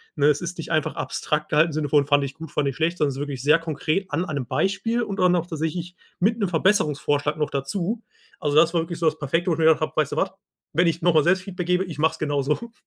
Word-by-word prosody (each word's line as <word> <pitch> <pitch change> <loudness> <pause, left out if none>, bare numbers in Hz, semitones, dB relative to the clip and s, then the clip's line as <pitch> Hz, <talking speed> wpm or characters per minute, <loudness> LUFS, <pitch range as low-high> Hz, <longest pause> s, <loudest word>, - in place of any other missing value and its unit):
Ne, 145 -1 +3
es 150 -1 +3
ist 170 0 -5
nicht 165 - -6
einfach 155 -2 0
abstrakt 150 0 -2
gehalten, 155 +2 +4
im - - -7
Sinne 150 -2 -2
von: 145 -2 +4
Fand 145 -1 +3
ich 140 0 -7
gut, 160 -1 -9
fand 145 -2 0
ich 135 - -6
schlecht, 170 +2 0
sondern 150 - +2
es 135 - -5
ist - - -6
wirklich 140 -3 -4
sehr 150 +3 +5
konkret 165 +4 -2
an 165 +5 0
einem 145 -7 -3
Beispiel 225 - 0
und 200 -2 -4
dann 180 -1 +4
auch 170 -1 -1
tatsächlich 165 +2 -4 0.2
mit 220 +5 +2
'nem 200 -4 0
Verbesserungsvorschlag 155 -5 +1
noch 150 - -1
dazu. 180 - -2 0.4
Also 145 -1 -1
das 170 +2 +5
war 165 - +3
wirklich 165 0 -6
so 165 - +2
das 155 0 +1
perfekte, 165 +5 0
wo 165 - +2
ich - - -7
mir 160 - +3
gedacht 160 -1 +5
habe: 155 - -1
„Weißt 155 -3 +1
du - - -4
was? 190 - +1 0.5
Wenn 170 +2 +4
ich 165 +1 0
nochmal 160 -4 +4
selbst 185 +3 +2
Feedback 180 -2 -5
gebe, 180 +1 +2
ich 160 -5 -8
mache 160 +1 +3
es - - -11
genau 145 -2 0
so.“ 225 - -2
160 Hz, 280 wpm, -24 LUFS, 150-180 Hz, 0.5 s, sehr